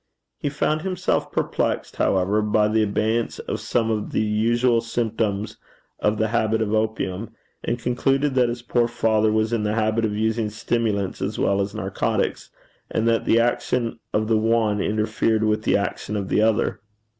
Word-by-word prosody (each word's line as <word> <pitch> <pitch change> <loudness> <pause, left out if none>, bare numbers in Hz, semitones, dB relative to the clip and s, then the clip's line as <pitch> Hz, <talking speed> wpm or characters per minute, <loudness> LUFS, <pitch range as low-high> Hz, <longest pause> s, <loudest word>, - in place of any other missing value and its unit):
He 145 - -1
found 150 +2 0
himself 185 0 -1
perplexed, - - -1
however, 95 +3 +2
by 105 0 +2
the 110 +1 +2
absence 110 +2 0
of - - -4
some 115 -1 0
of 105 -1 -2
the - - +2
usual 115 +3 +2
symptoms 110 -3 -2 0.4
of 105 +1 +1
the 110 0 +1
habit 110 -1 +1
of 110 -1 -1
opium, 110 -2 -2 0.3
and 120 - -1
concluded 135 +4 +1
that 125 -2 +3
his 120 0 -5
poor 120 -1 +1
father 110 -2 +2
was 110 +1 +1
in 115 - +1
the 105 0 -1
habit 110 0 +1
of 105 -2 0
using 110 0 0
stimulants 105 -2 -1
as 100 +2 -2
well 100 0 +2
as 100 +2 -3
narcotics, 95 -2 -2 0.4
and 110 +1 0
that 115 -1 +2
the 115 - +4
action 120 0 0
of 110 0 0
the 110 -1 +3
one 110 -2 +2
interfered 110 +1 0
with 110 0 +1
the - - +4
action 100 +1 -3
of 100 -2 -4
the - - +2
other. 110 +1 +1
110 Hz, 175 wpm, -23 LUFS, 105-115 Hz, 0.4 s, the